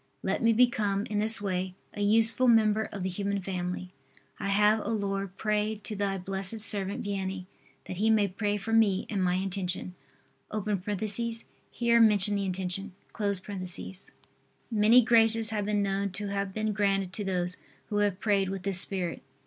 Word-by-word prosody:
Let - - -1
me 230 0 +4
become, 215 -4 +2
in 210 - 0
this 220 +2 +2
way, 185 -2 -3 0.2
a 205 - -5
useful 225 +4 +2
member 220 -2 +3
of 200 -3 -5
the 190 - -1
human 200 +2 -2
family. 180 -1 -4 0.5
I - - -3
have, 210 +2 +3
O - - -4
Lord, 195 -3 -3
prayed 215 0 -1
to 215 - -6
Thy 195 -1 -1
blessed 195 +3 -4
servant 200 -2 +2
Vianney, 190 -2 -3 0.4
that 185 - -7
he 215 +3 +2
may 215 -2 +3
pray 205 +2 -2
for 220 +3 -4
me 210 -4 +3
and 195 -3 0
my 180 0 +1
intention. 185 -1 -3 0.6
(Here 215 +3 -1
mention 210 -2 +5
the 200 -1 -1
intention.) 190 +1 -2 1.8
Many 225 +3 +5
graces 225 -1 +4
have 210 -2 -2
been 205 -1 0
known 200 0 -1
to 205 +1 -4
have 200 -1 -2
been 215 +1 -2
granted 195 -2 0
to 210 - -4
those 180 -2 -1 0.3
who 205 - -1
have 205 -2 +1
prayed 200 -3 +1
with 195 -1 -5
this 195 -2 +4
spirit. 180 -4 -1
200 Hz, 165 wpm, -28 LUFS, 190-215 Hz, 1.8 s, mention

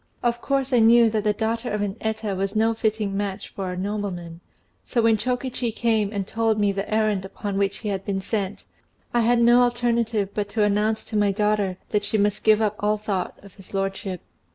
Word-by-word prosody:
Of 240 0 0
course 275 -1 0
I 245 - +5
knew 230 0 +6
that 215 -1 0
the 210 - +3
daughter 230 +3 -2
of 210 0 -1
an 200 -1 -2
Eta 220 -2 -2
was 195 +2 -2
no 225 +1 +3
fitting 220 -2 -1
match 200 -1 -3
for 190 -2 -5
a 180 - -5
nobleman; 185 -4 -4 0.4
so 245 - -2
when 225 -1 +5
Chokichi 250 +1 -2
came 220 -2 +1
and 200 -3 -2
told 225 +1 0
me 205 -1 +3
the 195 +1 -4
errand 215 -3 +1
upon 200 +1 -5
which 200 0 0
he 215 - -4
had 195 -1 -2
been 195 -1 -2
sent, 195 0 -3 0.5
I 240 - +3
had 235 +1 +3
no 240 +1 +6
alternative 235 -4 +1
but 205 -1 -2
to 210 +1 +1
announce 210 +2 +1
to 220 - -8
my 205 -1 +3
daughter 205 -2 0
that 210 -1 0
she 210 +2 0
must 205 0 +1
give 215 0 +5
up 210 -1 0
all 210 +1 +1
thought 205 -3 -3
of 200 -2 -14
his 195 0 -12
lordship. 195 -1 -3
210 Hz, 215 wpm, -24 LUFS, 200-225 Hz, 0.5 s, knew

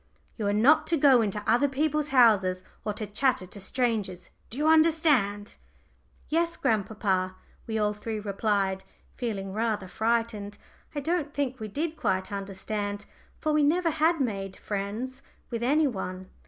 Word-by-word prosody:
You 215 -3 -2
are - - +2
not 235 +9 +4
to 330 - +2
go 270 -4 +6
into 210 -1 -2
other 245 +5 +4
people's 300 +2 0
houses 205 -9 +4 0.2
or 210 - -1
to 215 +1 -3
chatter 210 0 +1
to 200 +3 -10
strangers. 200 -5 -2 0.2
Do 235 - -6
you 300 +2 +1
understand?" 305 -11 +3 0.7
"Yes, 335 +2 0
grandpapa," 195 -3 0 0.3
we 220 -1 -2
all 210 -1 +1
three 215 +1 -5
replied, 200 -2 0 0.3
feeling 195 -5 -4
rather 215 -3 -1
frightened. 220 -1 -1 0.4
I 290 - -1
don't 315 -1 -1
think 265 -2 -1
we 215 - -4
did 310 +9 -3
quite 190 +1 -1
understand, 205 +1 -4 0.4
for 310 -1 +1
we 300 - +4
never 330 +4 +3
had 320 +2 +2
made 195 -7 -2
friends 215 +6 -4 0.3
with 235 -1 -3
any 295 +6 +3
one. 190 -6 -4
220 Hz, 155 wpm, -27 LUFS, 200-285 Hz, 0.7 s, go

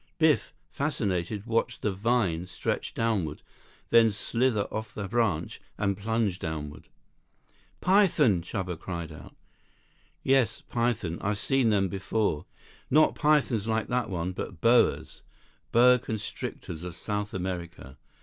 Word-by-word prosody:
Biff, 160 -2 +3 0.2
fascinated, 105 - -2
watched 115 +1 -1
the 105 - +1
"vine" 95 -4 0
stretch 90 - -3
downward, 100 -10 -1 0.5
then 115 -1 +7
slither 115 +1 0
off 110 -1 -5
the 105 -3 -4
branch 105 -7 0 0.2
and 100 -1 0
plunge 105 -2 -1
downward. 75 -2 -5 0.9
"Python!" 165 - +4
Chuba 90 -2 -4
cried 85 -3 -5
out. 75 - -12 0.9
"Yes. 135 -3 +2
Python. 115 -8 -1
I've 100 +1 0
seen 130 +2 +2
them 100 -3 +2
before. 95 -3 -1 0.4
Not 155 +3 +5
pythons 140 -8 +2
like 110 -1 0
that 125 -3 0
one, 90 -1 -2
but 90 -1 -6
boas. 80 - +3 0.5
Boa 125 +1 +6
constrictors 105 -7 -5
of 90 -1 -6
South 105 +2 -3
America. 85 -7 -5
105 Hz, 120 wpm, -28 LUFS, 90-120 Hz, 0.9 s, then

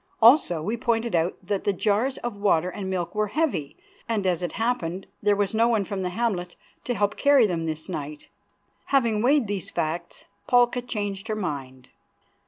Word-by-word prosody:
Also 225 - +5
we 215 +7 -1
pointed 230 0 0
out 170 +1 +1
that 200 +1 -2
the 205 - +2
jars 215 +7 0
of 240 -3 -3
water 185 -4 +2
and 190 -1 -5
milk 180 -3 -2
were 210 0 0
heavy, 210 - -1 0.3
and, 215 -4 0
as 180 -2 +1
it 175 -3 -3
happened, 195 -6 -2 0.2
there 205 0 +3
was 200 0 0
no 225 +1 +3
one 225 -4 +2
from 195 0 -4
the 180 - -1
hamlet 180 -4 -2 0.3
to 245 - -1
help 205 -1 +1
to - - -10
carry 280 -4 +6
them 170 -5 -1
this 155 0 -4
night. 150 -4 -6 0.6
Having 235 -6 +2
weighed 270 +2 +3
these 200 -3 -3
facts, 160 +2 -4 0.2
Palka 245 0 +4
changed 205 -4 -4
her 215 - -1
mind. 135 -10 -5
205 Hz, 190 wpm, -25 LUFS, 175-230 Hz, 0.6 s, carry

